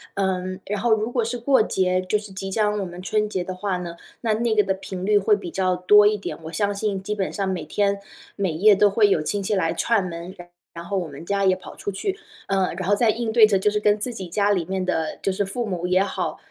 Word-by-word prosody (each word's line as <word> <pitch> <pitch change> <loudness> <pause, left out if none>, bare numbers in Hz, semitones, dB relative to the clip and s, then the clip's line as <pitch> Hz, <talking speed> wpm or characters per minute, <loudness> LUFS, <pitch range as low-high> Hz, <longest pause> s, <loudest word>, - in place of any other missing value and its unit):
嗯， 185 -1 -1
然 205 0 -3
后 240 - +1
如 220 +1 0
果 240 -3 +1
是 240 +2 -3
过 260 0 +3
节， 185 -2 +1
就 185 +3 0
是 205 -2 -11
即 195 0 -5
将 210 0 +1
我 200 - -2
们 175 0 -8
春 210 +2 0
节 185 - -2
的 185 +1 -5
话 190 0 -2
呢， 175 -1 -6 0.2
那 225 -2 0
那 230 +1 0
个 210 - +5
的 190 -1 0
频 190 -1 -6
率 210 0 +4
会 205 +2 +3
比 175 - -7
较 185 0 0
多 205 +3 +6
一 210 0 +3
点。 200 - -6
我 160 - -7
相 200 +4 0
信 200 -1 -2
基 210 +2 -3
本 195 -2 -2
上 195 -1 -2
每 190 -1 -2
天 200 -1 0 0.4
每 195 -4 -1
夜 200 +7 +5
都 205 +1 +4
会 205 +1 +4
有 170 - +2
亲 200 +6 -2
戚 200 +2 -1
来 165 -3 +1
串 200 +1 +1
门， 170 +1 -7
然 175 0 -12 0.2
然 170 - -8
后 195 +3 -3
我 180 -3 -2
们 145 +2 -10
家 200 +1 0
也 185 -1 +4
跑 185 - -11
出 - - -4
去。 380 - -3 0.3
呃， 190 -3 +1
然 185 +1 -3
后 205 - +4
在 225 +2 +3
应 230 -1 -3
对 220 -2 +7
着 200 -2 +2
就 200 +2 +1
是 210 - 0
跟 210 0 +3
自 240 +4 -3
己 190 -5 -6
家 200 +4 +1
里 180 -5 +1
面 190 +1 -2
的 160 -3 -1
就 195 - 0
是 200 +2 -1
父 235 +5 -3
母 180 -4 -3
也 185 +1 +3
好， 200 - -3
195 Hz, 295 characters per minute, -23 LUFS, 185-210 Hz, 0.4 s, 对